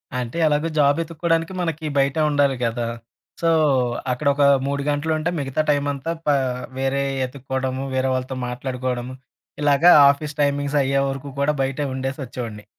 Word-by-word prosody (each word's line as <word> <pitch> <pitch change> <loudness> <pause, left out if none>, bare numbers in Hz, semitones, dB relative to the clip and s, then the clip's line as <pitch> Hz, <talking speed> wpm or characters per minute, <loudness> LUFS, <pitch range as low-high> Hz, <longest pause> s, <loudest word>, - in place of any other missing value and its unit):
అంటే, 125 +4 -4
ఎలాగో 150 +2 +1
జాబెతుక్కోడానికి 165 +3 +1
మనకీ 160 -2 -3
బయటే 140 +2 +2
ఉండాలి 145 -2 +2
గదా! 115 0 -2 0.5
సో, 165 - +1 0.6
అక్కడొక 140 +2 +1 0.2
3 140 0 -1
గంటలుంటే, 155 +2 0
మిగతా 140 +2 -1
టైమంతా 145 +1 0 0.2
పా 145 - +4 0.4
వేరేయి 135 +1 -1
యెతుక్కోడము, 130 0 -3
వేరే 130 0 +1
వాళ్ళతో 130 0 -3
మాట్లాడుకోడము, 125 0 -4 0.5
ఇలాగ 145 +1 +3 0.3
ఆఫీస్ 150 +1 -6
టైమింగ్సయ్యేవరకు 140 -1 0
కూడా 145 +2 +2
బయటే 135 +2 -1
ఉండేసొచ్చేవోడిని. 130 -5 -5
140 Hz, 115 wpm, -22 LUFS, 130-145 Hz, 0.6 s, పా